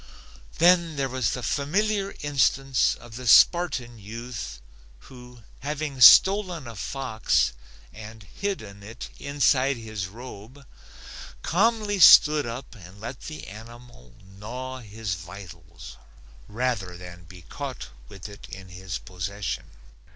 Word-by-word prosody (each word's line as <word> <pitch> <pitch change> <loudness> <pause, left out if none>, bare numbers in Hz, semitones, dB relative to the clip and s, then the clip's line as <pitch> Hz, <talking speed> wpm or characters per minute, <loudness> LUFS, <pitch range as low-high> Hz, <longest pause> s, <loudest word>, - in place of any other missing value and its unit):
Then 170 -1 +4
there 135 -1 -1
was 130 -4 -1
the 125 - -5
familiar 195 - -1
instance 135 -2 +1
of 120 -1 -12
the 125 -1 -7
Spartan 130 - +4
youth 115 - -7 0.4
who 125 -2 -14 0.2
having 145 -2 -4
stolen 185 -2 +7
a 115 -1 -9
fox 110 - 0 0.4
and 110 0 -11
hidden 105 - -6
it 110 +4 -9
inside 140 -2 +1
his 110 -4 -5
robe 120 +4 -12 0.8
calmly 210 +2 +1
stood 150 -4 +8
up 120 +3 -7
and 95 -2 -14
let 120 +4 -7
the 155 -1 -8
animal 115 - -13 0.2
gnaw 130 +4 -6
his 110 -3 -5
vitals 85 -3 -11 0.5
rather 105 -6 -3
than 90 -1 -12
be 90 0 -14
caught 80 - -7 0.2
with 95 - -10
it 100 -1 -13
in 95 -1 -10
his 90 +1 -6
possession. 95 +2 -5
120 Hz, 120 wpm, -25 LUFS, 100-140 Hz, 0.8 s, stood